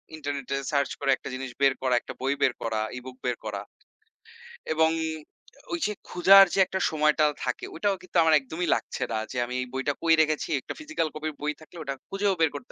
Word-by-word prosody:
ইন্টারনেটে 140 Hz, -3 st, -4 dB, 0.2 s
search 140 Hz, -2 st, +1 dB
করে 135 Hz, -, +2 dB
একটা -, -, -4 dB
জিনিস 130 Hz, 0 st, -5 dB
বের 135 Hz, -1 st, +5 dB
করা, 130 Hz, -1 st, +1 dB
একটা -, -, -8 dB
বই 135 Hz, +2 st, +1 dB
বের 130 Hz, -, +4 dB
করা, 110 Hz, -1 st, -1 dB, 0.2 s
e-book 125 Hz, 0 st, -9 dB
বের 125 Hz, -1 st, 0 dB
করা। 105 Hz, -2 st, -3 dB, 1.1 s
এবং 160 Hz, 0 st, +4 dB, 0.8 s
ঐ -, -, -2 dB
যে 210 Hz, -, 0 dB, 0.2 s
খুঁজার 195 Hz, +2 st, +8 dB
যে -, -, +1 dB
একটা 190 Hz, -, -3 dB
সময়টা 155 Hz, 0 st, +3 dB, 0.2 s
থাকে, 125 Hz, -, -2 dB
ঐটাও 200 Hz, +4 st, +1 dB
কিন্তু 185 Hz, 0 st, -4 dB
আমার 160 Hz, -1 st, +4 dB
একদমই 160 Hz, +6 st, -4 dB
লাগছে -, -, -4 dB
না 110 Hz, -, 0 dB
যে, 130 Hz, -, -5 dB
আমি 125 Hz, -, -7 dB
এই 125 Hz, -, -4 dB
বইটা 130 Hz, +2 st, -1 dB
কই 165 Hz, -1 st, +5 dB
রেখেছি? 155 Hz, -1 st, 0 dB
একটা -, -, -6 dB
physical 315 Hz, -, -2 dB
copy 155 Hz, +1 st, -4 dB
র -, -, -19 dB
বই 150 Hz, 0 st, -1 dB
থাকলে 155 Hz, +2 st, -14 dB
ওটা 140 Hz, -2 st, -3 dB, 0.2 s
খুঁজেও 195 Hz, 0 st, +1 dB
বের 160 Hz, -, +5 dB
করতে 250 Hz, -, -8 dB
150 Hz, 210 wpm, -27 LUFS, 130-165 Hz, 1.1 s, খুঁজার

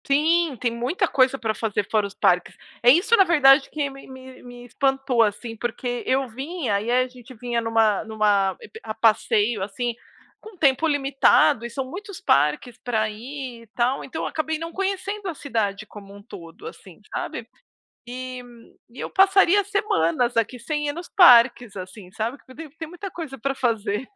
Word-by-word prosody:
Sim, 310 Hz, +1 st, +2 dB
tem 240 Hz, -, 0 dB
muita 280 Hz, -, -1 dB
coisa 265 Hz, -2 st, +2 dB
pra 225 Hz, -4 st, -2 dB
fazer 210 Hz, -3 st, -2 dB
fora 215 Hz, -2 st, +1 dB
os 200 Hz, -, -13 dB
parques. 180 Hz, 0 st, +1 dB, 0.3 s
É 240 Hz, -, +5 dB
isso, 350 Hz, -, +5 dB
na 395 Hz, -, +6 dB
verdade, 280 Hz, -6 st, +5 dB
que 295 Hz, -2 st, -2 dB
me 275 Hz, 0 st, -13 dB
me 260 Hz, 0 st, -12 dB
me 245 Hz, 0 st, -12 dB
espantou, 270 Hz, -1 st, 0 dB
assim, 225 Hz, +2 st, -1 dB
porque 240 Hz, +1 st, -4 dB
eu 265 Hz, +1 st, +1 dB
vim, 270 Hz, +5 st, -5 dB
aí 205 Hz, +3 st, 0 dB
a 255 Hz, +1 st, +2 dB
gente 250 Hz, 0 st, -14 dB
vinha 235 Hz, +1 st, -2 dB
numa 225 Hz, -2 st, +2 dB
numa 205 Hz, -3 st, +1 dB
ep 220 Hz, -, -12 dB
a 215 Hz, -1 st, -6 dB
passeio, 220 Hz, -1 st, +2 dB
assim, 235 Hz, +5 st, -3 dB, 0.5 s
com 435 Hz, -3 st, -13 dB
tempo 280 Hz, 0 st, +2 dB
limitado 275 Hz, -5 st, +3 dB
e -, -, -5 dB
são 265 Hz, +2 st, -4 dB
muitos 385 Hz, +7 st, -9 dB
parques 150 Hz, -, +1 dB
pra 220 Hz, -3 st, 0 dB
ir 250 Hz, +2 st, -8 dB
e -, -, -20 dB
tal, 250 Hz, +3 st, 0 dB
então 295 Hz, -, -6 dB
eu -, -, -2 dB
acabei 315 Hz, 0 st, -2 dB
não 330 Hz, +1 st, -6 dB
conhecendo 390 Hz, +1 st, -3 dB
a 335 Hz, -, -5 dB
cidade 215 Hz, -8 st, -3 dB
como 200 Hz, -1 st, -13 dB
um 200 Hz, -, -14 dB
todo, 175 Hz, -, -12 dB
assim, 460 Hz, -, -12 dB
sabe. -, -, -5 dB, 0.6 s
E 255 Hz, +1 st, -7 dB, 0.5 s
e 235 Hz, -, -17 dB
eu -, -, -5 dB
passaria 390 Hz, 0 st, +4 dB
semanas 245 Hz, -, 0 dB
aqui 230 Hz, +2 st, -1 dB
sem 295 Hz, +4 st, -3 dB
ir 290 Hz, -, -2 dB
nos 345 Hz, +2 st, -8 dB
parques, 245 Hz, -, +5 dB
assim, 185 Hz, 0 st, -9 dB
sabe, 230 Hz, +6 st, -4 dB
porque 260 Hz, -, -17 dB
tem 320 Hz, 0 st, -10 dB
tem 320 Hz, +2 st, -9 dB
muita 355 Hz, +4 st, -8 dB
coisa 320 Hz, -6 st, -7 dB
pra 270 Hz, +4 st, -2 dB
fazer. 225 Hz, -2 st, -2 dB
250 Hz, 185 wpm, -23 LUFS, 225-295 Hz, 0.6 s, na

